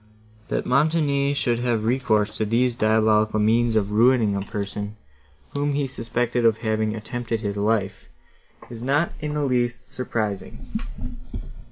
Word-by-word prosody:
That - - -2
Montoni 145 -1 +2
should 120 -4 0
have 120 -3 0
recourse 110 -4 +1
to - - 0
these 120 +3 +1
diabolical 110 -1 +3
means 115 +2 +3
of 105 -2 +1
ruining 115 -1 +4
a 100 - -1
person, 100 +1 -5 0.6
whom 145 0 -1
he 145 0 0
suspected 120 -1 -1
of 115 -2 +4
having 110 0 0
attempted 115 +1 -4
his 100 -2 -2
life, 100 -2 -1 0.6
is 115 -1 -8
not 145 +7 +1
in 150 -1 -3
the 150 - 0
least 125 -2 -1
surprising. 110 -5 -4
115 Hz, 140 wpm, -24 LUFS, 110-125 Hz, 0.6 s, ruining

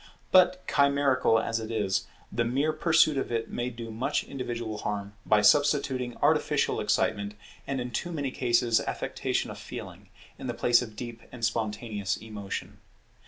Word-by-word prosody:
But 185 0 +5
chimerical 140 -4 +3
as 115 0 -1
it 110 0 -6
is, 100 -4 0 0.2
the 120 - +1
mere 135 +6 +1
pursuit 155 -2 +4
of - - -3
it 115 -1 -2
may 120 +1 -2
do 115 -2 -7
much 130 +6 -1
individual 120 -5 -4
harm 100 -1 -3
by 105 -1 +4
substituting 135 -2 +3
artificial - - +2
excitement, 100 -1 0 0.3
and 135 -1 -1
in 125 0 -4
too 175 +9 -3
many 145 -5 -2
cases 120 -2 +2
affectation - - -2
of - - -9
feeling, - - -9 0.3
in - - -5
the - - -3
place 120 0 +4
of 110 -3 -7
deep 120 0 -7
and 115 -2 -2
spontaneous 105 -3 -2
emotion. 105 -3 -6
120 Hz, 160 wpm, -28 LUFS, 110-135 Hz, 0.3 s, But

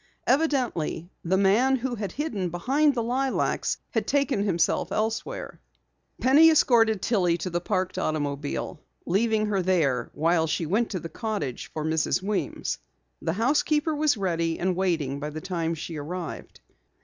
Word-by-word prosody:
Evidently 250 - 0
the 185 +3 +1
man 215 +8 +4
who 260 0 -2
had 205 -5 -4
hidden 220 - -2
behind 270 - +2
the 235 - 0
lilacs 260 +3 0
had - - -1
taken 275 -7 +1
himself 175 -5 +1
elsewhere. 220 +1 -3 0.6
Penny 290 +5 +7
escorted 225 - +4
Tillie 180 -7 +2
to 180 +1 -4
the 175 +1 -1
parked 185 -1 -1
automobile, 145 0 -2 0.3
leaving 215 +4 +2
her 200 -2 0
there 165 -9 +1
while 165 +1 +2
she 160 +2 -1
went 215 +8 +1
to 185 - -3
the 165 - -6
cottage 195 - -4
for 155 -1 -4
Mrs. 160 0 +1
Weems. 200 +2 -2 0.4
The 160 - -1
housekeeper 295 - +1
was 300 -4 +2
ready 170 -4 -1
and 185 0 0
waiting 160 -7 0
by 150 +1 -4
the 155 +1 -6
time 170 -2 -2
she 160 0 -6
arrived. 170 +4 -6
190 Hz, 150 wpm, -26 LUFS, 165-240 Hz, 0.6 s, Penny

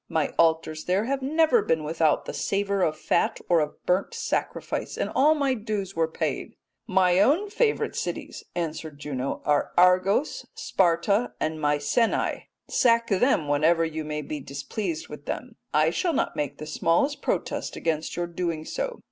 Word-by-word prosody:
My 160 -2 +1
altars 160 -1 +2
there 190 +4 +1
have 270 +2 -1
never 320 - +3
been 160 - 0
without 155 0 +1
the - - -5
savour 200 0 0
of 155 -3 +1
fat 170 - +1
or 170 -2 +4
of 150 -1 -4
burnt 185 - +1
sacrifice 465 0 -3
and - - -2
all 300 +4 +5
my 280 -3 +1
dues 210 -4 -4
were 165 -1 +2
paid.' 160 - -3 0.3
"'My 185 -1 +3
own 330 - +3
favourite 440 +1 +1
cities,' - - -4
answered 160 -3 -4
Juno, 140 -2 -4
'are 145 -1 +2
Argos, 185 - +3
Sparta, 200 - +1
and 155 0 -2
Mycenae. 145 +10 +1 0.2
Sack 230 -2 +3
them 195 - +2
whenever 160 +3 +3
you 160 -1 -4
may 150 0 -4
be 150 +1 -5
displeased 155 +6 -4
with 150 -1 -11
them. 250 -3 -5 0.2
I 155 +1 +3
shall 340 - 0
not - - 0
make 145 -1 -3
the 155 - -7
smallest 170 - +1
protest - - -2
against 160 -1 -2
your 175 - -1
doing 170 -2 -3
so. - - -4
175 Hz, 165 wpm, -26 LUFS, 155-230 Hz, 0.3 s, all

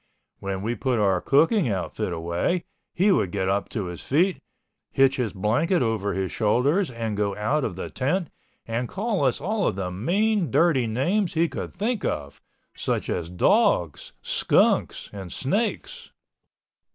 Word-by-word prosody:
When 95 0 -4
we 115 +3 -1
put 125 +2 -1
our 95 -4 +2
cooking 160 - +3
outfit 100 +1 -2
away, 85 - -1 0.3
he 195 +4 +3
would 95 - +2
get 95 -1 -1
up 100 +1 0
on 105 -4 -1
his 90 -1 -7
feet, 175 +7 +1 0.5
hitch 135 0 +3
his 120 -5 -1
blanket 120 - +1
over 110 -3 -1
his 95 -1 -2
shoulders 135 - +2
and 115 -3 -3
go 100 -1 -1
out 130 +9 0
of 100 - -2
the 95 - -6
tent 155 +6 -1 0.3
and 115 +2 -3
call 205 -3 -1
us 130 -3 +2
all 200 +5 0
the 90 -1 -4
mean 185 - +1
dirty 135 -3 +3
names 170 - 0
he 165 +1 +3
could - - -6
think 220 +1 -1
of, 70 -1 -3 0.3
such - - -2
as 85 -2 -3
dogs, 85 -2 +2
skunks - - +2
and 95 -4 -7
snakes. 205 - -2
120 Hz, 155 wpm, -25 LUFS, -, 0.5 s, cooking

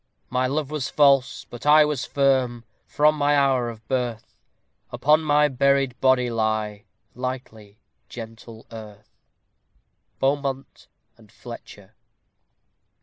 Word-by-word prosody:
My 130 0 +1
love 145 +1 -2
was 150 -3 -3
false, 135 -3 +3
but 120 - -11
I 150 +1 +6
was 150 -4 -2
firm 130 -4 +1 0.2
From 150 +1 +3
my 145 -1 +2
hour 135 -4 +2
of 110 -1 -11
birth; 125 -4 -3 0.6
Upon 155 +2 +3
my 150 -1 +3
buried 140 -1 +1
body 130 -2 +3
lie 110 -2 -2 0.3
Lightly, 120 -5 -7 0.3
gentle 115 -1 -10
earth. 105 -2 -12 1.0
BEAUMONT 135 -1 -2 0.3
AND - - -20
FLETCHER. - - -12
130 Hz, 110 wpm, -23 LUFS, 115-140 Hz, 1.0 s, I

